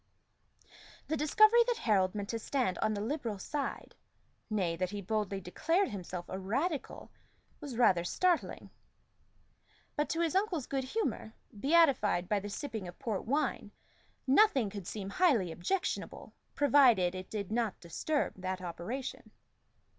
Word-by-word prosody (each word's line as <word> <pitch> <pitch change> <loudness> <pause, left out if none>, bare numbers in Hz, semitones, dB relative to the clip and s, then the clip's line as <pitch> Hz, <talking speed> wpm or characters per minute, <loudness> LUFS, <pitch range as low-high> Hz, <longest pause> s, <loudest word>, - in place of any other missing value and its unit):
The 315 - +1
discovery 430 +10 +5
that 485 -2 +1
Harold 195 - +2
meant 205 -1 -4
to 230 - -2
stand 245 -6 -1
on 215 - +1
the 205 - -3
Liberal 230 -3 -3
side 280 +8 -4 0.6
nay, 185 -6 0
that 185 +2 -2
he 205 +1 -5
boldly 200 0 -2
declared 330 - 0
himself 180 -4 -6
a 190 - -5
Radical 275 - -3 0.5
was 280 -7 -7
rather 185 -8 +4
startling; 350 - 0 1.2
but 295 - 0
to 330 - 0
his 335 +1 0
uncle's 375 - 0
good 270 -1 -2
humor, 260 - -3 0.2
beatified 270 - +3
by 205 +1 +1
the 205 +1 -6
sipping 220 -4 -5
of 175 - -10
port 215 -5 -3
wine, 275 -4 -1 0.6
nothing 270 - +4
could 200 -3 -7
seem 200 -2 -5
highly 235 - +3
objectionable, 265 - -3 0.2
provided 245 -11 +5
it 185 0 -7
did 205 -2 -4
not 225 -3 -1
disturb 285 - -2
that 185 0 -3
operation. 185 +9 -6
220 Hz, 140 wpm, -32 LUFS, 190-295 Hz, 1.2 s, discovery